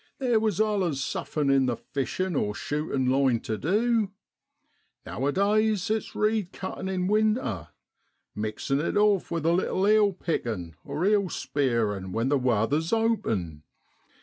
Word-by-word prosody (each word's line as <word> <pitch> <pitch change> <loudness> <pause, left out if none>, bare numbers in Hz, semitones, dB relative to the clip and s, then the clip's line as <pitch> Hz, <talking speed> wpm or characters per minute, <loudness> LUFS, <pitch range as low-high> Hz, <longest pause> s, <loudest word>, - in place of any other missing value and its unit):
There 245 -4 +2
was 215 -4 0
allus 195 -9 +1
somethin' 140 +1 -1
in 135 -1 +3
the 120 - 0
fishin' 145 +9 -3
or 105 -5 0
shootin' 145 -3 -2
line 130 -2 +3
tu 110 - -3
du. 215 - +1 1.0
Now 135 - -3
a - - +2
days 210 +2 +1
it's 220 0 -2
reed 210 -3 0
cuttin' 190 0 -5
in 185 -1 -1
winter, 210 - +1 0.7
mixin' 110 +6 -2
it 170 - -1
off 205 -3 +3
with 165 -2 -2
a 165 - +4
little 185 +2 +1
eel 210 -1 +5
pickin' 115 - -3 0.2
(eel 190 +6 +1
spearing) 110 - -1
when 115 +3 0
the 145 -1 +2
wather's 130 +6 +1
open. 190 - 0
165 Hz, 145 wpm, -27 LUFS, 125-210 Hz, 1.0 s, eel